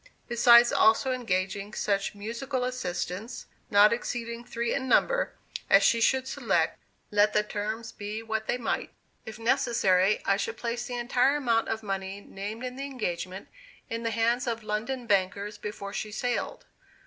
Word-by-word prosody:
besides 235 Hz, 0 st, +6 dB
also 225 Hz, +4 st, +4 dB
engaging 200 Hz, -3 st, -2 dB
such 200 Hz, 0 st, -1 dB
musical 235 Hz, +5 st, -3 dB
assistants, 220 Hz, -2 st, -4 dB, 0.2 s
not 205 Hz, +2 st, +6 dB
exceeding 235 Hz, 0 st, -4 dB
three 235 Hz, 0 st, -2 dB
in 265 Hz, -1 st, -2 dB
number, -, -, +2 dB, 0.3 s
as -, -, +6 dB
she 230 Hz, -, +4 dB
should 260 Hz, +2 st, +2 dB
select, -, -, 0 dB, 0.3 s
let 210 Hz, 0 st, +4 dB
the 210 Hz, -, +3 dB
terms 215 Hz, +2 st, -4 dB
be 210 Hz, +2 st, -6 dB
what 220 Hz, -1 st, -3 dB
they -, -, 0 dB
might. 240 Hz, -, -2 dB, 0.4 s
If 220 Hz, 0 st, -7 dB
necessary, 210 Hz, -4 st, +2 dB
I 195 Hz, -, +3 dB
should 225 Hz, +2 st, -3 dB
place 240 Hz, 0 st, -3 dB
the 245 Hz, -, -4 dB
entire 245 Hz, +3 st, +2 dB
amount 235 Hz, -6 st, +1 dB
of 220 Hz, 0 st, -2 dB
money 195 Hz, -1 st, -4 dB
named 205 Hz, +4 st, -7 dB
in 250 Hz, 0 st, -6 dB
the 275 Hz, -, -4 dB
engagement 190 Hz, -8 st, -4 dB, 0.4 s
in 230 Hz, 0 st, -2 dB
the 230 Hz, -, -1 dB
hands 235 Hz, +3 st, +1 dB
of 230 Hz, -1 st, -2 dB
London 230 Hz, +4 st, -3 dB
bankers 200 Hz, 0 st, 0 dB
before 205 Hz, -1 st, -6 dB
she 215 Hz, 0 st, -4 dB
sailed. 245 Hz, -, -3 dB
225 Hz, 160 wpm, -28 LUFS, 205-240 Hz, 0.4 s, besides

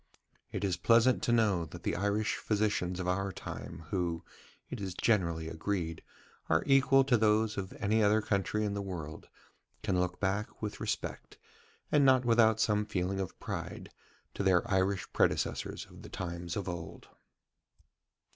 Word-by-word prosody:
It -, -, -3 dB
is 95 Hz, -3 st, 0 dB
pleasant 115 Hz, +2 st, +4 dB
to -, -, 0 dB
know 105 Hz, -7 st, +3 dB
that -, -, -11 dB
the -, -, 0 dB
Irish 100 Hz, +3 st, 0 dB
physicians 100 Hz, -4 st, 0 dB
of 90 Hz, -, -3 dB
our 100 Hz, +2 st, 0 dB
time, 80 Hz, -2 st, -8 dB
who, 85 Hz, -3 st, -1 dB, 0.4 s
it -, -, -6 dB
is 95 Hz, -3 st, -4 dB
generally 85 Hz, -8 st, +1 dB
agreed, 80 Hz, 0 st, -3 dB, 0.5 s
are 80 Hz, +1 st, +3 dB
equal 135 Hz, 0 st, +5 dB
to 130 Hz, -3 st, +3 dB
those 110 Hz, 0 st, +2 dB
of 95 Hz, -1 st, -4 dB
any 110 Hz, +1 st, +1 dB
other 105 Hz, +1 st, +4 dB
country 105 Hz, 0 st, 0 dB
in 100 Hz, -, -1 dB
the 100 Hz, -, -2 dB
world, 85 Hz, -6 st, -7 dB, 0.5 s
can 95 Hz, -4 st, +1 dB
look 90 Hz, 0 st, -1 dB
back 100 Hz, +2 st, -2 dB
with 105 Hz, -1 st, -4 dB
respect, -, -, -4 dB, 0.5 s
and 145 Hz, -1 st, +5 dB
not 130 Hz, -2 st, +5 dB
without 115 Hz, -2 st, +4 dB
some 105 Hz, -1 st, +2 dB
feeling 95 Hz, -1 st, -2 dB
of 95 Hz, -3 st, -5 dB
pride, -, -, -6 dB, 0.4 s
to -, -, -4 dB
their 95 Hz, +3 st, +3 dB
Irish 95 Hz, 0 st, +1 dB
predecessors -, -, 0 dB
of -, -, -14 dB
the -, -, -10 dB
times 85 Hz, 0 st, -4 dB
of 100 Hz, -, -3 dB
old. 85 Hz, -2 st, -6 dB
100 Hz, 160 wpm, -31 LUFS, 90-110 Hz, 0.5 s, equal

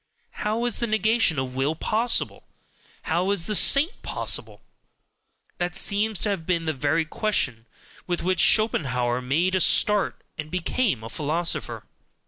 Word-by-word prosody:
How 220 Hz, +3 st, -2 dB
is 240 Hz, -, 0 dB
the 235 Hz, -, -1 dB
negation 220 Hz, -5 st, +1 dB
of 130 Hz, -1 st, -3 dB
will 135 Hz, +4 st, -1 dB
POSSIBLE? 225 Hz, +8 st, -1 dB, 0.6 s
how 175 Hz, +4 st, -1 dB
is 200 Hz, -4 st, 0 dB
the 215 Hz, -, -3 dB
saint 285 Hz, -, +3 dB
possible? -, -, -3 dB, 1.0 s
that 175 Hz, -1 st, -2 dB
seems 205 Hz, +1 st, +2 dB
to 215 Hz, -, +1 dB
have 195 Hz, -5 st, -2 dB
been 170 Hz, -1 st, -1 dB
the 160 Hz, -, -1 dB
very 150 Hz, +4 st, 0 dB
question 130 Hz, -, -2 dB, 0.4 s
with 175 Hz, -1 st, -2 dB
which 185 Hz, +1 st, 0 dB
Schopenhauer 125 Hz, -, +2 dB
made 160 Hz, +9 st, 0 dB
a 185 Hz, -, +2 dB
start 210 Hz, +2 st, +3 dB, 0.2 s
and 150 Hz, 0 st, -5 dB
became 180 Hz, -, -1 dB
a 115 Hz, -, -7 dB
philosopher. 160 Hz, +6 st, -2 dB
175 Hz, 145 wpm, -24 LUFS, 150-215 Hz, 1.0 s, saint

